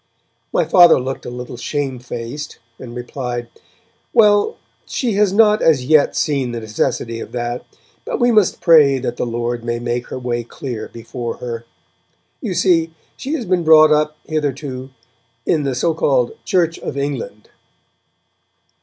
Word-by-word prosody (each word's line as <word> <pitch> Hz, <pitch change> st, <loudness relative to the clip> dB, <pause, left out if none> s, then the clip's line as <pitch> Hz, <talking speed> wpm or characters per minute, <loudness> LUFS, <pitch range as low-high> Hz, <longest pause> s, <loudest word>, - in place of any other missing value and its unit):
My -, -, +2 dB
Father 175 Hz, -5 st, +7 dB
looked 130 Hz, +1 st, -5 dB
a -, -, -3 dB
little 125 Hz, 0 st, -7 dB
shame 135 Hz, 0 st, -3 dB
faced, 120 Hz, +4 st, -7 dB, 0.2 s
and 120 Hz, -2 st, -9 dB
replied: 120 Hz, -1 st, -5 dB, 0.6 s
'Well, 210 Hz, -, +4 dB, 0.3 s
she 240 Hz, -5 st, -1 dB
has 205 Hz, -1 st, +3 dB
not 210 Hz, +1 st, +4 dB
as 145 Hz, -6 st, +3 dB
yet 150 Hz, 0 st, +4 dB
seen 135 Hz, -5 st, 0 dB
the 120 Hz, -, -3 dB
necessity 115 Hz, +1 st, -2 dB
of -, -, -8 dB
that, 120 Hz, 0 st, -3 dB, 0.4 s
but -, -, -3 dB
we 245 Hz, -1 st, +4 dB
must 215 Hz, -4 st, +2 dB
pray 150 Hz, -5 st, +6 dB
that 120 Hz, -2 st, -4 dB
the -, -, -2 dB
Lord 120 Hz, 0 st, -3 dB
may 120 Hz, 0 st, -2 dB
make 120 Hz, +1 st, -3 dB
her -, -, -6 dB
way 120 Hz, -2 st, -2 dB
clear 120 Hz, -1 st, -6 dB
before 115 Hz, 0 st, -6 dB
her. 115 Hz, -1 st, -6 dB, 0.8 s
You 205 Hz, -8 st, -3 dB
see, 165 Hz, -3 st, +2 dB, 0.2 s
she 280 Hz, -, -5 dB
has 250 Hz, -7 st, -4 dB
been 180 Hz, -1 st, +1 dB
brought 155 Hz, -1 st, +7 dB
up, 150 Hz, 0 st, +2 dB
hitherto, 140 Hz, -4 st, -3 dB, 0.6 s
in 150 Hz, -3 st, +1 dB
the 135 Hz, -2 st, -1 dB
so 165 Hz, +6 st, +1 dB
called 130 Hz, -6 st, +1 dB
Church 170 Hz, -4 st, +1 dB
of 140 Hz, -, -5 dB
England.' 135 Hz, -7 st, -4 dB
135 Hz, 155 wpm, -19 LUFS, 120-165 Hz, 0.8 s, Father